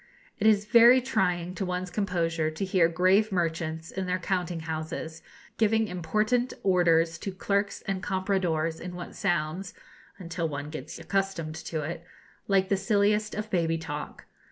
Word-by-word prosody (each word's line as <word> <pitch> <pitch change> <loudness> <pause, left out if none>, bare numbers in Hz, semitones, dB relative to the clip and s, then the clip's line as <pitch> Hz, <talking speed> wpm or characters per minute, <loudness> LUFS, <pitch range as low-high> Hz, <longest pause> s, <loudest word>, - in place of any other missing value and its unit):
It 215 - +3
is 210 -1 +4
very 235 +3 +7
trying 180 -8 0
to 195 - -3
one's 180 0 -3
composure 170 -5 0
to 160 +5 -3
hear 185 -3 +3
grave 185 +6 +3
merchants, 165 -2 -2
in 190 -1 -3
their 180 0 +1
counting 180 -3 -2
houses, 160 0 -5 0.4
giving 220 0 +3
important 215 +8 0
orders 170 -3 +3
to 195 - -4
clerks 200 +2 -1
and 195 -1 -2
compradors 180 -5 0
in 180 0 -7
what 175 - -7
sounds, 175 0 -1 0.4
until 170 -3 -3
one 145 0 -5
gets 155 -1 -7
accustomed 170 -2 -2
to 160 -1 -4
it, 165 +2 -5 0.4
like 195 -1 +2
the 195 - +2
silliest 210 +2 +1
of 215 +1 -4
baby 165 -2 +1
talk. 150 -2 -6
180 Hz, 155 wpm, -28 LUFS, 165-200 Hz, 0.4 s, very